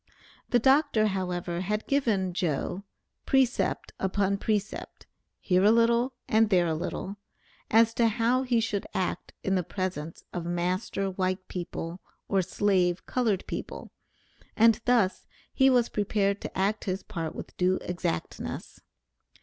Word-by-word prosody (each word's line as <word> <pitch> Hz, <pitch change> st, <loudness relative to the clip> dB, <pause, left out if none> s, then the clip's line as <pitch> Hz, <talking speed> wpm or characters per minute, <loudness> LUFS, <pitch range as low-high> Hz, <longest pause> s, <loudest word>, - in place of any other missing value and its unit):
The 245 Hz, -, +4 dB
Dr., 265 Hz, -3 st, +4 dB
however, 180 Hz, -2 st, -2 dB
had 210 Hz, +3 st, -2 dB
given 215 Hz, -10 st, +1 dB
"Joe" 175 Hz, +3 st, -2 dB, 0.4 s
precept 265 Hz, -2 st, +1 dB
upon 195 Hz, +1 st, 0 dB
precept, 210 Hz, -1 st, -3 dB, 0.3 s
"here 185 Hz, 0 st, +2 dB
a 205 Hz, -, +6 dB
little, 235 Hz, +2 st, +3 dB
and 220 Hz, 0 st, +3 dB
there 180 Hz, -4 st, +4 dB
a 165 Hz, -, 0 dB
little," 185 Hz, +5 st, -4 dB, 0.5 s
as 225 Hz, +1 st, +5 dB
to 230 Hz, 0 st, +3 dB
how 235 Hz, +3 st, +2 dB
he 250 Hz, -3 st, +1 dB
should 215 Hz, -3 st, -2 dB
act 180 Hz, -1 st, -2 dB
in 195 Hz, -, 0 dB
the 185 Hz, -, +2 dB
presence 175 Hz, -3 st, -4 dB
of 175 Hz, -, -3 dB
master 180 Hz, +3 st, -1 dB
white 185 Hz, 0 st, -2 dB
people, 175 Hz, 0 st, -5 dB, 0.3 s
or 195 Hz, -1 st, +2 dB
slave 185 Hz, -1 st, +1 dB
colored 225 Hz, -7 st, 0 dB
people, -, -, -6 dB, 0.7 s
and 225 Hz, 0 st, +5 dB
thus 230 Hz, -6 st, +2 dB, 0.3 s
he 270 Hz, -1 st, +5 dB
was 245 Hz, -2 st, +4 dB
prepared 200 Hz, -1 st, 0 dB
to -, -, -6 dB
act 200 Hz, +3 st, 0 dB
his 190 Hz, 0 st, -2 dB
part 165 Hz, -6 st, -5 dB
with -, -, -8 dB
due 185 Hz, +1 st, +2 dB
exactness. 130 Hz, -, -4 dB
195 Hz, 140 wpm, -28 LUFS, 180-225 Hz, 0.7 s, a